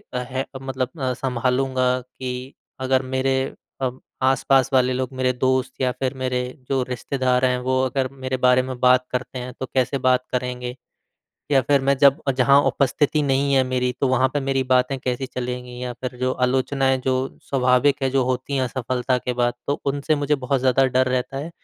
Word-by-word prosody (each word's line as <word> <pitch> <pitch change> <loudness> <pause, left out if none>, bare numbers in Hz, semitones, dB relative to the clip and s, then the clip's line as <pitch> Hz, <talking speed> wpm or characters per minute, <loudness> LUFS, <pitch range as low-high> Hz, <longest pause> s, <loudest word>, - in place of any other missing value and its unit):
है 130 +2 -3 0.2
मतलब 130 -1 -3
अ, 130 -1 0
संभालूँगा। 130 0 0
कि 125 +1 -7 0.3
अगर 130 0 +2
मेरे 130 0 0 0.4
अ, 130 - +1 0.3
आस-पास 135 0 +3
वाले 130 0 +3
लोग 130 0 -2
मेरे 130 0 +1
दोस्त 130 +1 0
या 125 -1 +2
फिर 130 +1 -3
मेरे 125 -1 -1 0.3
जो 135 -1 +1
रिश्तेदार 130 +1 0
हैं 125 0 +2
वो 130 +1 0
अगर 130 0 -1
मेरे 130 -1 -4
बारे 125 0 +4
में 130 -1 -6
बात 125 0 +4
करते 130 0 -3
हैं 125 0 -6
तो - - -2
कैसे 130 +1 +1
बात 130 -1 +2
करेंगे? 125 -1 -3 0.8
या 135 -2 +5
फिर 140 +2 +3
मैं 140 +1 +2
जब 140 -1 +6 0.2
जहाँ 140 +2 +5
उपस्थिति 145 +2 +1
नहीं 140 0 +1
है 135 - +5
मेरी 125 -1 0
तो 140 - +3
वहाँ 130 0 +3
पे 145 +2 -2
मेरी 135 -1 0
बातें 130 +1 +3
कैसी 125 +1 -2
चलेंगी? 125 -1 -5
या 125 -1 -3
फिर 125 0 -6
जो 130 0 +1
आलोचनाएँ 130 +1 +1
जो 130 0 -1
स्वाभाविक 135 +1 +2
है 130 - +1
जो 135 0 +2
होती 130 +2 -2
हैं 130 - +1
असफलता 125 0 -1
के 125 - -3
बाद 120 0 0
तो 145 - -1
उनसे 145 +2 0
मुझे 145 0 +1
बहुत 135 -1 -1
ज़्यादा 130 +1 +3
डर 130 0 +2
रहता 130 +1 -2
है। 150 +4 -5
130 Hz, 190 wpm, -22 LUFS, 125-135 Hz, 0.8 s, जब